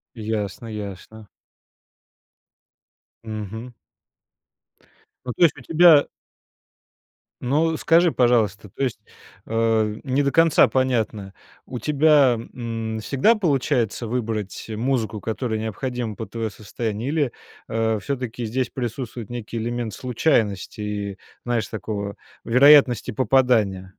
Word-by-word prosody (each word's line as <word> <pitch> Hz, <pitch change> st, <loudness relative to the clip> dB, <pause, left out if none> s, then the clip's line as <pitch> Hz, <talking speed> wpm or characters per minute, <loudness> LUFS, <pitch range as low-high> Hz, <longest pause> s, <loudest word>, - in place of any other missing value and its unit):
Ясно 110 Hz, 0 st, -4 dB
ясно. 105 Hz, 0 st, -8 dB, 2.0 s
Мгм. 110 Hz, +2 st, -6 dB, 1.5 s
Ну, 125 Hz, -, -3 dB
то -, -, +2 dB
есть 160 Hz, -, +4 dB
у -, -, -10 dB
тебя 165 Hz, 0 st, +6 dB, 1.3 s
Ну, 155 Hz, +5 st, +1 dB
скажи, 170 Hz, 0 st, +4 dB
пожалуйста, 110 Hz, -5 st, +1 dB
то 135 Hz, -, -4 dB
есть, 120 Hz, -5 st, -2 dB, 0.5 s
э, 110 Hz, -1 st, +1 dB
не 135 Hz, +1 st, +1 dB
до 140 Hz, -, +1 dB
конца 165 Hz, -2 st, +5 dB
понятно. 110 Hz, -6 st, -1 dB, 0.3 s
У 125 Hz, -, -6 dB
тебя, 145 Hz, -4 st, +4 dB, 0.2 s
м, 115 Hz, -2 st, -4 dB
всегда 140 Hz, -, +2 dB
получается 135 Hz, -, 0 dB
выбрать 110 Hz, -4 st, -3 dB
музыку, 110 Hz, -2 st, -2 dB
которая 110 Hz, 0 st, -2 dB
необходима 110 Hz, +1 st, -4 dB
под 110 Hz, -, -7 dB
твое 115 Hz, -1 st, -3 dB
состояние? 110 Hz, +3 st, -5 dB
Или, 145 Hz, -5 st, 0 dB, 0.4 s
э, 110 Hz, -1 st, 0 dB
всё-таки 125 Hz, -3 st, -4 dB
здесь 125 Hz, +3 st, -1 dB
присутствует 120 Hz, -2 st, -5 dB
некий 120 Hz, -1 st, -6 dB
элемент 115 Hz, -1 st, -3 dB
случайности 110 Hz, -, 0 dB
и, 105 Hz, -1 st, -4 dB, 0.3 s
знаешь, 115 Hz, -4 st, 0 dB
такого 100 Hz, -2 st, -4 dB, 0.3 s
вероятности 125 Hz, -1 st, +5 dB
попадания? 110 Hz, -6 st, +2 dB
115 Hz, 110 wpm, -23 LUFS, 110-130 Hz, 2.0 s, тебя